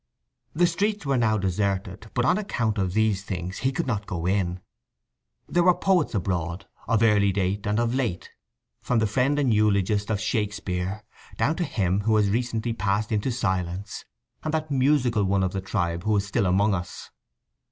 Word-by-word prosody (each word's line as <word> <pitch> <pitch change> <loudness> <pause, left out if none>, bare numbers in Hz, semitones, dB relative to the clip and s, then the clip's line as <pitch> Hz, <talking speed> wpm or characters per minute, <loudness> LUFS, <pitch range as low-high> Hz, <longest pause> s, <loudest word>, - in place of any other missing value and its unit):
The 175 +3 +4
streets 200 +2 -1
were 140 -1 +1
now 110 -2 +2
deserted, 95 +1 -2
but 125 -1 +2
on 180 +9 +3
account 115 - -1
of 95 -2 -1
these 110 -2 +1
things 90 -2 -5
he 130 - +1
could 165 +5 -2
not 105 -5 -2
go 85 -4 -4
in. 90 -1 0 0.9
There 175 - +2
were 180 0 +5
poets 180 - +2
abroad, 90 -1 -2 0.2
of 115 0 +2
early 105 -3 +4
date 100 +1 -1
and 105 +2 +1
of 120 0 +1
late, 120 -10 -2 0.5
from 125 - 0
the 110 - +3
friend 130 +7 +1
and 135 -5 +2
eulogist 105 -1 +2
of 110 -2 0
Shakespeare 105 -3 -2 0.3
down 155 - +1
to 180 - 0
him 95 - 0
who 110 +1 +2
has 105 -2 +3
recently 115 0 -1
passed 105 0 -1
into 110 +4 0
silence, 95 -3 -2 0.4
and 155 - -2
that 155 -1 -3
musical 130 -5 +2
one 95 0 +1
of 95 - -1
the 95 - -2
tribe 85 -2 -2
who 110 0 +1
is 100 - 0
still 100 -1 0
among 100 +3 +3
us. 90 -1 -5
105 Hz, 185 wpm, -25 LUFS, 95-120 Hz, 0.9 s, were